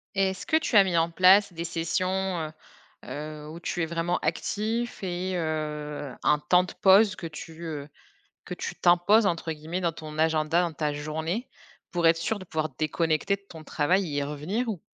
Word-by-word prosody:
Et 195 -1 +2
est-ce 190 - -8
que 315 -2 +3
tu 310 -6 -2
as 200 - +9
mis 180 -3 0
en 165 +1 +3
place 185 +2 +5
des 165 +1 -4
sessions, 180 +1 -1
heu 155 - -10 0.6
heu, 150 0 -6
où 165 +2 -8
tu 175 - -2
es - - +2
vraiment 170 +1 -1
actif 220 +8 -2
et 185 +1 -2
heu, 150 -3 -3
un 150 0 +3
temps 180 +4 +4
de 185 - -8
pause 195 +1 +6
que 165 - -6
tu 160 +1 -9
heu, 150 -3 -5 0.6
que - - -4
tu - - -5
«t'imposes» 180 +5 +5
entre 165 -2 -1
guillemets 160 +4 -5
dans 170 -1 +1
ton 155 -1 -9
agenda, 160 +2 +2
dans 170 - -1
ta 150 -1 -1
journée, 160 - -3 0.4
pour 175 -2 +1
être 165 0 +6
sûr 205 +6 -2
de 185 - -9
pouvoir 155 -3 -2
déconnecter 160 +4 +1
de 200 - -27
ton 160 -2 -11
travail 180 +6 +1
et 145 -2 -3
y - - +1
revenir 150 - -2
ou 195 -7 -3
170 Hz, 200 wpm, -27 LUFS, 155-190 Hz, 0.6 s, as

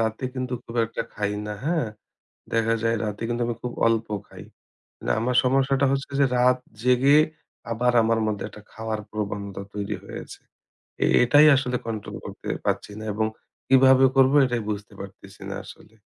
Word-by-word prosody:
রাতে 110 +3 -1
কিন্তু 130 -1 -4
খুব 115 - -10
একটা 115 - -4
খাই 105 0 -1
না, 105 - -4
হ্যাঁ? 160 -5 +1 0.7
দেখা 115 0 +2
যায় 115 0 +2
রাতে 105 +1 -4
কিন্তু 120 0 -1
আমি 120 - -2
খুব 125 - -4
অল্প 115 0 +2 0.2
খাই। - - -11 0.8
আমার 125 +1 0
সমস্যাটা 135 +1 +2
হচ্ছে 140 +1 -2
যে, 140 - +6
রাত 125 +1 +4 0.2
জেগে 125 +3 +5 0.5
আবার 120 +2 +1
আমার 115 0 +2
মধ্যে 105 -2 -2
একটা 105 - -13
খাও 110 +1 -9
য়ার 110 -1 -1
প্রবণতা 100 -2 -4
তৈরি 100 -1 -3
হয়েছে। - - -9 0.6
এ - - +4 0.2
এটাই 145 +5 +6
আসলে 125 -2 -1
কন্ট্রোল 110 -2 -5
করতে - - -9 0.2
পারছি - - -1
না 110 - -7
এবং 110 +1 0 0.4
কিভাবে 130 0 +6
করব? 135 0 +5
এটাই 120 -2 -2
বুঝতে 105 +1 -5
পারতেছি 100 -1 -11
না - - -4
আসলে। 110 - -14
115 Hz, 170 wpm, -24 LUFS, 110-130 Hz, 0.8 s, যে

